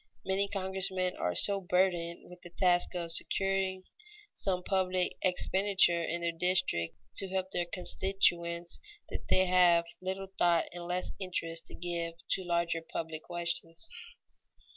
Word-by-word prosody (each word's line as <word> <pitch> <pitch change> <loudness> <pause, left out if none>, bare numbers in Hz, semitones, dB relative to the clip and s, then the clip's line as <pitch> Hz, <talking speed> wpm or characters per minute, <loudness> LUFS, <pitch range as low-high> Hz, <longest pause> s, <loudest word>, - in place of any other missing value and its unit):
Many 195 +1 +1
congressmen 190 -2 -1
are 90 -1 -1
so 200 -1 +7
burdened 175 -2 0
with 180 0 -13
the 175 - -11
task 175 0 +2
of 170 -2 -3
securing 190 +2 0 0.5
some 180 -2 -1
public 185 -1 0
expenditure 185 -1 +3
in 170 +1 -2
their 170 0 0
district 165 - 0 0.2
to 195 - +1
help 190 0 -2
their 175 -2 -1
constituents 175 -2 0 0.3
that - - -6
they 185 - +4
have 175 -2 +5 0.2
little 190 +1 -4
thought 170 -2 +4
and 175 -1 -7
less 180 +1 -2
interest 165 -3 -3
to - - -10
give 170 -1 -3 0.2
to 190 - +3
larger 170 -1 0
public 160 -1 -5
questions. 170 - -4
180 Hz, 140 wpm, -31 LUFS, 170-190 Hz, 0.5 s, so